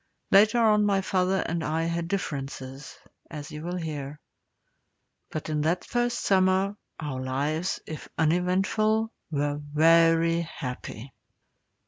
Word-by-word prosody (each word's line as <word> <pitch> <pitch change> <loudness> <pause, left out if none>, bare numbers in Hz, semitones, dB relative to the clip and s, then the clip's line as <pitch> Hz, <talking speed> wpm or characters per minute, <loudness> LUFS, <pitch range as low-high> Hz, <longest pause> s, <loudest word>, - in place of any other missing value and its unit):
Later 210 +4 +6
on 215 -2 +4
my 200 -1 +3
father 190 0 +1
and 170 -1 -2
I 160 +2 0
had 170 0 -2
differences, 135 -6 -5 0.3
as 150 -3 -7
you 150 - -7
will 175 +2 -4
hear. 150 -3 -5 1.1
But 155 - -5
in 155 -1 -1
that 170 +4 0
first 240 0 0
summer 190 +1 +3 0.2
our 145 -5 -4
lives, 145 +7 -1
if 155 - -8
uneventful, 195 +7 +1 0.2
were 145 -1 -1
very 165 +2 +4
happy. 130 -5 -7
165 Hz, 120 wpm, -27 LUFS, 150-190 Hz, 1.1 s, Later